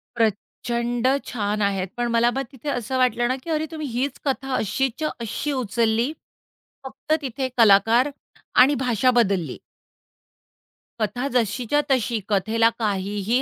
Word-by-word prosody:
प्रचंड 235 Hz, +2 st, -1 dB, 0.2 s
छान 210 Hz, -2 st, -2 dB
आहेत. 195 Hz, -2 st, 0 dB
पण 240 Hz, 0 st, 0 dB
मला 235 Hz, +1 st, +3 dB
मग 270 Hz, +2 st, -2 dB
तिथे 270 Hz, +2 st, -7 dB
असं 245 Hz, -1 st, -2 dB
वाटलं 245 Hz, -1 st, +2 dB
ना 255 Hz, -, 0 dB
की 335 Hz, -, -8 dB
अरे 315 Hz, 0 st, 0 dB
तुम्ही 310 Hz, -2 st, -5 dB
हीच 260 Hz, +3 st, -2 dB
कथा 270 Hz, -1 st, -1 dB
अशीच्या 265 Hz, +8 st, -1 dB
अशी 235 Hz, +6 st, -3 dB
उचलली. 235 Hz, 0 st, 0 dB, 0.7 s
फक्त 265 Hz, +3 st, -3 dB
तिथे 260 Hz, 0 st, -3 dB
कलाकार 225 Hz, +4 st, +5 dB, 0.5 s
आणि 275 Hz, +3 st, +5 dB
भाषा 250 Hz, +1 st, +3 dB
बदलली. 195 Hz, -7 st, 0 dB, 1.4 s
कथा 230 Hz, +6 st, -1 dB
जशीच्या 245 Hz, +4 st, +1 dB
तशी. 235 Hz, -3 st, +1 dB
कथेला 220 Hz, +3 st, +3 dB
काहीही 205 Hz, +2 st, 0 dB
240 Hz, 130 wpm, -23 LUFS, 215-265 Hz, 1.4 s, कलाकार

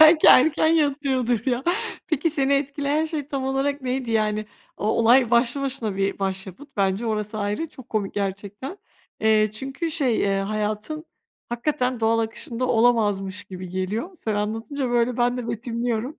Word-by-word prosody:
Belki 315 Hz, 0 st, +8 dB
erken 305 Hz, +4 st, +6 dB
yatıyordur 270 Hz, -7 st, +1 dB
ya. 250 Hz, 0 st, 0 dB, 0.4 s
Peki 325 Hz, 0 st, +1 dB
seni 280 Hz, -2 st, +1 dB
etkileyen 285 Hz, +2 st, 0 dB
şey 305 Hz, -3 st, -4 dB
tam 275 Hz, -2 st, -2 dB
olarak 270 Hz, +1 st, -1 dB
neydi? 255 Hz, -1 st, -2 dB
Yani 215 Hz, -1 st, +1 dB, 0.3 s
o -, -, -3 dB
olay 230 Hz, +2 st, +4 dB
başlı 240 Hz, +3 st, +3 dB
başına 250 Hz, -7 st, -2 dB
bir 195 Hz, 0 st, 0 dB
başyapıt 195 Hz, +7 st, -4 dB
bence, 195 Hz, +3 st, +1 dB
orası 215 Hz, 0 st, -2 dB
ayrı, 205 Hz, +10 st, -1 dB
çok 260 Hz, -5 st, -14 dB
komik 210 Hz, -3 st, -2 dB
gerçekten. 205 Hz, -, -4 dB, 0.4 s
Eee, 215 Hz, -1 st, +4 dB
çünkü 270 Hz, +8 st, -4 dB
şey, 275 Hz, -8 st, +1 dB
eee, 195 Hz, -1 st, +1 dB
hayatın 215 Hz, -, -3 dB, 0.4 s
hakikaten 250 Hz, 0 st, -1 dB
doğal 225 Hz, +1 st, +3 dB
akışında 230 Hz, +2 st, -2 dB
olamazmış 210 Hz, -5 st, +2 dB
gibi 185 Hz, -1 st, -8 dB
geliyor. 190 Hz, -, -3 dB
Sen 220 Hz, -9 st, -2 dB
anlatınca 225 Hz, +6 st, -2 dB
böyle 240 Hz, 0 st, +2 dB
ben 245 Hz, 0 st, +2 dB
de 240 Hz, -2 st, -4 dB
betimliyorum. 235 Hz, +3 st, -2 dB
235 Hz, 150 wpm, -24 LUFS, 215-275 Hz, 0.4 s, Belki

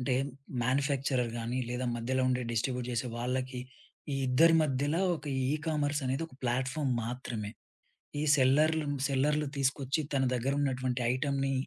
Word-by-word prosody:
అంటే 125 Hz, 0 st, 0 dB, 0.5 s
మాన్యుఫ్యాక్చరర్ 135 Hz, -1 st, +1 dB
గాని, 120 Hz, +2 st, -2 dB
లేదా 125 Hz, +1 st, -2 dB
మధ్యలో 130 Hz, +3 st, 0 dB
ఉండే 125 Hz, 0 st, +1 dB
డిస్ట్రిబ్యూట్ 125 Hz, +2 st, -1 dB
జేసే 120 Hz, +1 st, -1 dB
వాళ్ళకి 125 Hz, +1 st, -2 dB, 0.5 s
ఈ -, -, 0 dB
ఇద్దరి 165 Hz, +6 st, +5 dB
మధ్యల 145 Hz, +2 st, 0 dB, 0.2 s
ఒక 155 Hz, -, -13 dB, 0.3 s
ఈకామర్సనేది 150 Hz, -2 st, 0 dB
ఒక 140 Hz, -, -17 dB
ప్లాట్‌ఫామ్ 130 Hz, +3 st, 0 dB
మాత్రమే. 115 Hz, -3 st, -4 dB, 0.7 s
ఈ -, -, 0 dB, 0.2 s
సెల్లర్లున్ 145 Hz, +3 st, +3 dB
సెల్లర్లు 150 Hz, +2 st, +1 dB
తీసుకొచ్చి 135 Hz, +2 st, +1 dB
తన 135 Hz, -, +2 dB
దెగ్గరున్నటువంటి 130 Hz, -1 st, 0 dB
ఐటమ్‌ని 135 Hz, 0 st, 0 dB
130 Hz, 125 wpm, -31 LUFS, 125-145 Hz, 0.7 s, ఇద్దరి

